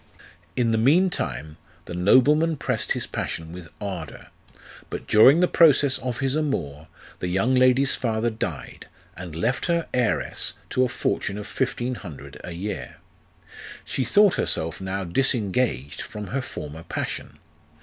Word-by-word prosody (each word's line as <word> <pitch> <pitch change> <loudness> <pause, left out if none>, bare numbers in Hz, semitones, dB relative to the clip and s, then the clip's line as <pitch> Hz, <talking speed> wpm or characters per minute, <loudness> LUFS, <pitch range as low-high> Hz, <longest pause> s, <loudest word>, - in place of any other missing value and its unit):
In 120 -2 +1
the 110 - +2
mean 170 +11 +4
time, 75 - -4 0.3
the - - -7
nobleman 145 - +4
pressed 120 -5 -1
his - - -3
passion 80 0 -5
with 85 -1 -10
ardour; 95 -6 -6 0.6
but - - -6
during 135 +10 +6
the 180 - +5
progress 145 -6 +5
of 125 -1 -4
his 135 +1 +1
amour, 85 - -2 0.3
the 90 - -3
young 95 +8 +1
lady's 130 +1 +4
father 115 -1 -1
died, 110 - -6 0.3
and 90 -3 -8
left 115 - -1
her 170 -1 0
heiress 125 -2 0 0.2
to 130 - +2
a - - +2
fortune 100 -4 -2
of 105 - -6
fifteen 125 0 -2
hundred 70 - -10
a 90 - -6
year. 100 +5 -5 0.9
She 130 - -1
thought 200 - +4
herself 80 +3 0
now 95 +1 -3
disengaged 100 - 0
from 105 -1 -7
her 135 +2 -1
former 80 - -7
passion. - - -5
115 Hz, 150 wpm, -24 LUFS, 90-135 Hz, 0.9 s, during